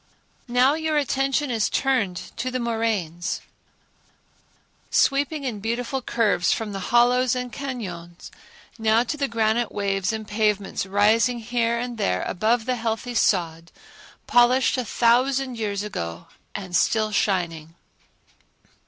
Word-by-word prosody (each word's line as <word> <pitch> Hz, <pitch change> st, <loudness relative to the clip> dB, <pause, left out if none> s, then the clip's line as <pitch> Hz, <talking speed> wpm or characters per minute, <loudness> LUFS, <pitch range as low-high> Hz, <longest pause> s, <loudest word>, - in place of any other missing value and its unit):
Now 250 Hz, +3 st, +4 dB
your 315 Hz, -1 st, -1 dB
attention 275 Hz, 0 st, 0 dB
is 225 Hz, -3 st, +1 dB
turned 245 Hz, -9 st, +1 dB, 0.2 s
to 255 Hz, -, -2 dB
the 255 Hz, 0 st, -3 dB
moraines, 220 Hz, -8 st, -2 dB, 1.5 s
sweeping 285 Hz, +2 st, +1 dB
in 240 Hz, -6 st, -3 dB
beautiful 235 Hz, +5 st, -2 dB
curves 220 Hz, -7 st, +1 dB
from 220 Hz, -2 st, -2 dB
the 195 Hz, -, -4 dB
hollows 245 Hz, +1 st, +4 dB
and 250 Hz, -2 st, -4 dB
cañons, 185 Hz, -11 st, -7 dB, 0.5 s
now 220 Hz, +1 st, +3 dB
to 250 Hz, -, -3 dB
the 280 Hz, -2 st, -1 dB
granite 225 Hz, -1 st, 0 dB
waves 195 Hz, -1 st, -1 dB
and 220 Hz, -1 st, -5 dB
pavements 210 Hz, -2 st, -1 dB
rising 220 Hz, +5 st, +3 dB
here 235 Hz, 0 st, -1 dB
and 240 Hz, -1 st, -4 dB
there 90 Hz, -, 0 dB
above 220 Hz, +4 st, 0 dB
the 255 Hz, 0 st, -1 dB
heathy 230 Hz, +1 st, -3 dB
sod, 170 Hz, -6 st, 0 dB, 0.5 s
polished 245 Hz, +2 st, +4 dB
a 255 Hz, -2 st, -2 dB
thousand 250 Hz, +2 st, +2 dB
years 205 Hz, -2 st, -2 dB
ago 85 Hz, -, -5 dB, 0.3 s
and 185 Hz, -3 st, -5 dB
still 215 Hz, +2 st, +2 dB
shining. 170 Hz, -6 st, -1 dB
230 Hz, 125 wpm, -24 LUFS, 200-250 Hz, 1.5 s, Now